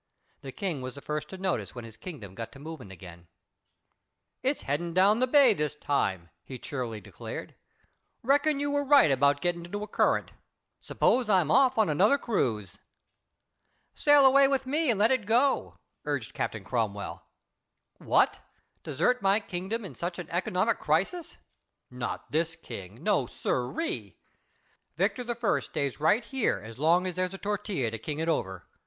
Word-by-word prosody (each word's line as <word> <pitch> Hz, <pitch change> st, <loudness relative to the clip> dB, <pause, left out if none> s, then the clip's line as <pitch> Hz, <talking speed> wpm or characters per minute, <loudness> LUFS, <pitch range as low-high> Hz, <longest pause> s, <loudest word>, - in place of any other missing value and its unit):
The 135 Hz, -1 st, -7 dB
King 170 Hz, -3 st, -3 dB
was 130 Hz, +1 st, -6 dB
the -, -, -8 dB
first 150 Hz, 0 st, -4 dB
to 190 Hz, -, -8 dB
notice 170 Hz, -, -2 dB
when 120 Hz, -2 st, -7 dB
his 115 Hz, -1 st, -11 dB
kingdom 125 Hz, -, -9 dB
got 115 Hz, +3 st, -7 dB
to -, -, -12 dB
moving 150 Hz, -7 st, -8 dB
again. 85 Hz, -2 st, -12 dB, 1.1 s
"It's 270 Hz, +2 st, -1 dB
headin' 165 Hz, +4 st, -2 dB
down 200 Hz, +4 st, +5 dB
the 255 Hz, -, +2 dB
bay 270 Hz, -3 st, +6 dB
this 150 Hz, -5 st, -2 dB
time," 95 Hz, -, -1 dB
he 130 Hz, -, -8 dB
cheerily 120 Hz, -4 st, -5 dB
declared. 100 Hz, -, -8 dB, 0.7 s
"Reckon 285 Hz, +3 st, +3 dB
you 285 Hz, 0 st, 0 dB
were 285 Hz, 0 st, +1 dB
right 275 Hz, -, +6 dB
about 140 Hz, +2 st, +3 dB
getting 175 Hz, -1 st, -1 dB
into 205 Hz, +4 st, -5 dB
a -, -, -6 dB
current. -, -, +1 dB, 0.5 s
S'pose 245 Hz, -3 st, +1 dB
I'm 185 Hz, -7 st, +3 dB
off 260 Hz, +1 st, +4 dB
on 220 Hz, -2 st, +4 dB
another 195 Hz, -, +4 dB
cruise." 105 Hz, -, -2 dB, 1.1 s
"Sail 290 Hz, -2 st, +5 dB
away 275 Hz, +1 st, +7 dB
with 270 Hz, -1 st, 0 dB
me, 300 Hz, +3 st, 0 dB
and 220 Hz, -4 st, +2 dB
let 220 Hz, +4 st, +4 dB
it 250 Hz, -6 st, 0 dB
go," 250 Hz, +5 st, +2 dB, 0.3 s
urged -, -, -3 dB
Captain -, -, -3 dB
Cromwell. -, -, -3 dB, 0.8 s
"What! -, -, +2 dB, 0.4 s
desert 250 Hz, -1 st, 0 dB
my 195 Hz, +2 st, +3 dB
kingdom 205 Hz, +3 st, -4 dB
in 170 Hz, -, -8 dB
such 175 Hz, +7 st, -4 dB
a 175 Hz, -, -5 dB
economic 185 Hz, +5 st, +1 dB
crisis! 195 Hz, -, -1 dB, 0.5 s
Not 125 Hz, -1 st, -5 dB
this 165 Hz, +1 st, 0 dB
King. 100 Hz, -, -10 dB
No, 195 Hz, -, +2 dB
siree. 130 Hz, -, -3 dB, 0.8 s
Victor 250 Hz, -, 0 dB
I. 230 Hz, -10 st, +1 dB
stays 135 Hz, +3 st, -3 dB
right 160 Hz, +10 st, +3 dB
here 265 Hz, -4 st, 0 dB
as 110 Hz, +2 st, -11 dB
long 170 Hz, +5 st, +3 dB
as 180 Hz, -2 st, -3 dB
there's 185 Hz, +1 st, -1 dB
a -, -, -7 dB
Tortilla 200 Hz, -, -2 dB
to 115 Hz, -, -5 dB
king 145 Hz, +6 st, -5 dB
it 160 Hz, +1 st, -2 dB
over. 95 Hz, -, -2 dB
175 Hz, 165 wpm, -28 LUFS, -, 1.1 s, away